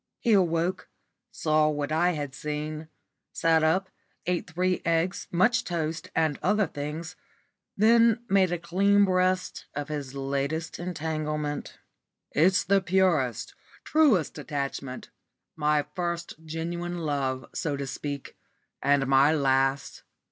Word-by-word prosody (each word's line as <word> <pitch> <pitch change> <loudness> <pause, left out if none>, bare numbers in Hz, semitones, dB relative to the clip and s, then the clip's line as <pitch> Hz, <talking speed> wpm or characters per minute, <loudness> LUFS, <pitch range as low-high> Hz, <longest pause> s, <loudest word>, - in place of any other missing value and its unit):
He 235 - +2
awoke, 175 -1 +1 0.4
saw 155 -1 +2
what 145 -1 -2
I 175 +3 +2
had 145 -4 -4
seen, 150 +1 -4 0.5
sat 165 -1 +3
up, 185 +4 +1 0.3
ate 180 0 -1
three 180 +3 0
eggs, 170 +3 0
much 220 +7 +3
toast, 165 -2 -3
and 155 -3 +1
other 210 +2 +2
things, 155 +3 -6 0.6
then 230 +2 +4
made 190 -2 +3
a 175 - 0
clean 200 +4 +3
breast 185 0 0
of 145 +1 -4
his 140 -3 -5
latest 140 +4 -2
entanglement. 155 -3 -3 0.5
"It's 185 +5 +3
the 195 0 +3
purest, 170 - +1 0.3
truest 280 - +2
attachment 140 -2 -5 0.4
my 150 -1 +1
first 170 -1 -3
genuine 170 +2 -4
love, 140 -5 -2
so 145 -3 -2
to 140 - -3
speak, 140 +1 -6 0.5
and 140 -1 +3
my 135 +2 +5
last. 135 -2 +1
160 Hz, 120 wpm, -27 LUFS, 145-180 Hz, 0.6 s, my